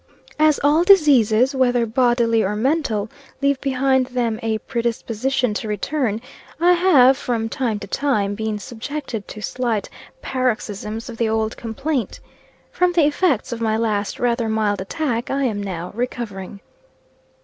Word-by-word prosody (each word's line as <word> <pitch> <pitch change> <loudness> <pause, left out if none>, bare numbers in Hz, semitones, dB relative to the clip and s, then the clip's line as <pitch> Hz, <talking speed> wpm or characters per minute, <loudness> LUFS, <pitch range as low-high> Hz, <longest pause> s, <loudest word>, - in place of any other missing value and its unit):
As 310 -1 +4
all 300 +4 +4
diseases, 270 - +5
whether 245 -3 +2
bodily 235 -1 +2
or 205 +1 -1
mental, 230 -4 0 0.3
leave 280 -1 +1
behind 265 -1 +1
them 240 -3 -1
a 225 -1 0
predisposition 235 +1 -1
to 215 - -4
return, 220 +1 -1 0.4
I 350 +2 +5
have, 290 -8 +5
from 230 -4 -2
time 230 -3 -1
to - - -5
time, 210 -5 0
been 220 0 -3
subjected 235 +1 -6
to 215 - -9
slight 235 -4 -2 0.3
paroxisms 225 - -3
of 235 -2 -8
the 230 -1 +1
old 220 0 -1
complaint. 260 +3 -3 0.5
From 360 0 +1
the 335 -4 +4
effects 290 - +1
of 235 -1 -4
my 220 -1 +1
last 210 -3 -1
rather 235 -2 0
mild 210 -3 0
attack, 240 +2 -2
I 275 +1 0
am 215 -6 -1
now 180 -3 -5
recovering. 205 -5 -5
235 Hz, 145 wpm, -21 LUFS, 220-270 Hz, 0.5 s, diseases